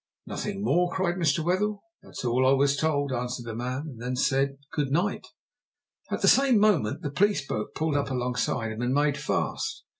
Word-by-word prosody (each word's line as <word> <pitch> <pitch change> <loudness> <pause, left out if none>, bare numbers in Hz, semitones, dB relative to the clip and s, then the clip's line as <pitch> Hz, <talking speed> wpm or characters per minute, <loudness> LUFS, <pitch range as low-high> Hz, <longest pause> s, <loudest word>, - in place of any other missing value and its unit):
"Nothing 205 -1 -4
more?" 180 -2 +2
cried 190 -2 0
Mr. 160 -2 +1
Wetherell. 200 +4 0 0.2
"That's - - -8
all 125 +2 +2
I - - +5
was 140 +1 +3
told," 145 -2 0
answered 125 0 -3
the 115 - -5
man, 125 +4 -3
and 130 -7 -9
then 125 +1 -2
said, 135 +1 +1 0.2
"Good 145 -3 0
night." 180 +7 0 0.8
At - - -3
the - - +5
same 270 -3 +5
moment 185 - +2
the 145 - -3
police 200 -2 +2
boat 105 -5 -4
pulled 155 -2 0
up 140 -1 0
alongside 125 -3 -1
him 110 +2 -5
and 125 +2 0
made 145 0 +2
fast. 445 - -2
140 Hz, 190 wpm, -27 LUFS, 125-175 Hz, 0.8 s, I